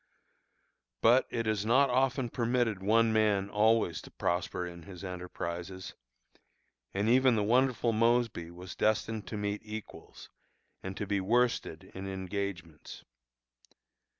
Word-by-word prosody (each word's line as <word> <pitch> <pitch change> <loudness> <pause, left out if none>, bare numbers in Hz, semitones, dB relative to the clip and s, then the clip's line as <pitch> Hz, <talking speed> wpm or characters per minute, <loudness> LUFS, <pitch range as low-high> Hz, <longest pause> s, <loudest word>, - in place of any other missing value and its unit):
But 120 +3 +5
it 115 -1 -2
is 110 -2 0
not 130 +5 +4
often 130 -1 +1
permitted 120 -4 0
one 110 +3 +3
man 105 -2 +2
always 105 -5 +2
to - - -12
prosper 90 0 -2
in 85 -1 -8
his 90 +1 -11
enterprises, 90 0 -6 1.0
and 100 +2 -1
even 130 +1 +5
the 105 - +1
wonderful 120 +1 +2
Mosby 115 -6 +1
was 90 +1 -9
destined 110 -1 0
to 105 - -5
meet 105 0 -2
equals, 110 0 -9 0.5
and 95 0 -6
to 105 - -2
be 100 -1 0
worsted 115 -6 0
in 95 +1 -6
engagements. 95 -4 -5
105 Hz, 125 wpm, -31 LUFS, 95-115 Hz, 1.0 s, But